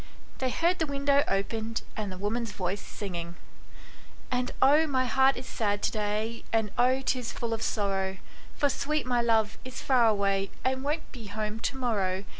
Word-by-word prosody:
They 260 - +1
heard 340 +7 +1
the 320 - +1
window 280 0 +3
opened 220 +3 -1
and 210 -3 -3
the 185 - -7
woman's 215 +3 -2
voice 190 +1 -2
singing: 175 -4 -5 0.5
" - - -22
And 250 0 0
oh, 295 +4 +6
my 260 -3 +1
heart 265 +2 +4
is 255 - -6
sad 205 -4 -1
to - - +2
day, 215 +2 -2
And 220 -2 +1
oh, 255 +2 +3
'tis 255 -3 -1
full 230 -1 -3
of 225 - -3
sorrow, 195 -3 0 0.4
For 290 - +2
sweet 305 +1 -1
my 245 -1 +2
love 225 -2 +2
is 255 0 -7
far 250 -4 +5
away, 200 -2 +2 0.2
And 260 0 +1
won't 300 +3 -2
be 230 -5 -9
home 215 +1 -3
to 265 +4 -2
morrow. 200 -7 0
230 Hz, 185 wpm, -29 LUFS, 205-260 Hz, 0.5 s, oh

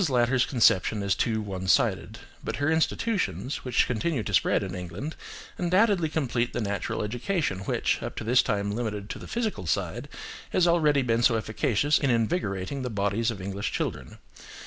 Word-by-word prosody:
Latter's 125 0 +2
conception 110 -4 +3
is 100 -1 +2
too 110 +2 0
one 95 -2 -5
sided; - - +2 0.3
but - - -3
her 145 +2 0
institutions, 165 - 0
which 125 -2 +1
continue 125 +2 -1
to 105 - -5
spread 100 - +3
in 95 -2 -5
England, 90 - -6 0.4
undoubtedly 185 -1 +3
complete 125 -6 -1
the - - -2
natural 100 -2 -2
education 120 - -1
which, - - 0
up - - -5
to - - -5
this 120 +3 +4
time 100 -3 -1
limited 105 -2 -3
to - - -6
the - - -9
physical 220 - -2
side, 75 - -2 0.4
has 180 -1 +3
already 150 -5 +3
been 115 -1 +1
so 120 -1 +4
efficacious 110 +6 +1
in 140 - +1
invigorating 115 - -1
the 125 - -3
bodies 105 +2 0
of 110 -4 -4
English 100 +2 -3
children. - - -4
120 Hz, 170 wpm, -27 LUFS, 100-145 Hz, 0.4 s, this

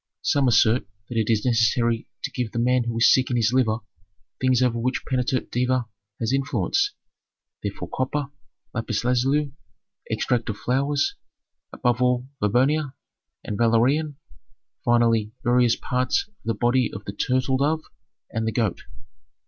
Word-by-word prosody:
Some 140 -2 +2
assert 115 -1 +3 0.2
that 120 - -4
it 110 - 0
is 110 0 +1
necessary 115 0 +2 0.2
to - - -3
give 120 -3 -3
the - - -4
man 125 +1 +2
who 115 -1 -3
is 115 - +6
sick 130 -1 +2
in 125 - 0
his 115 0 +2
liver 115 -4 +2 0.6
things 130 -1 +3
over 120 -2 +1
which 130 +3 -1
Peneter 130 0 0
Deva 125 0 0 0.3
has 115 +2 -1
influence, 390 - 0 0.7
therefore - - -5
copper, 140 +2 -2 0.4
lapis 115 -2 -2
lazuli, 135 +3 +1 0.6
extract 120 -2 0
of 105 - -3
flowers, 140 +5 0 0.6
above 125 0 0
all 125 0 +2
verbena 130 +7 +1 0.5
and 105 - -4
valerian, 130 +6 +2 0.7
finally, 115 -2 +2
various 120 -1 +3
parts 125 0 0
of 210 - -37
the 115 -1 0
body 120 +2 +2
of 100 +1 -8
the 100 - -5
turtle 130 +4 0
dove 155 +4 +1 0.5
and 110 0 -2
the - - +1
goat. 110 -5 -1
125 Hz, 150 wpm, -24 LUFS, 115-130 Hz, 0.7 s, is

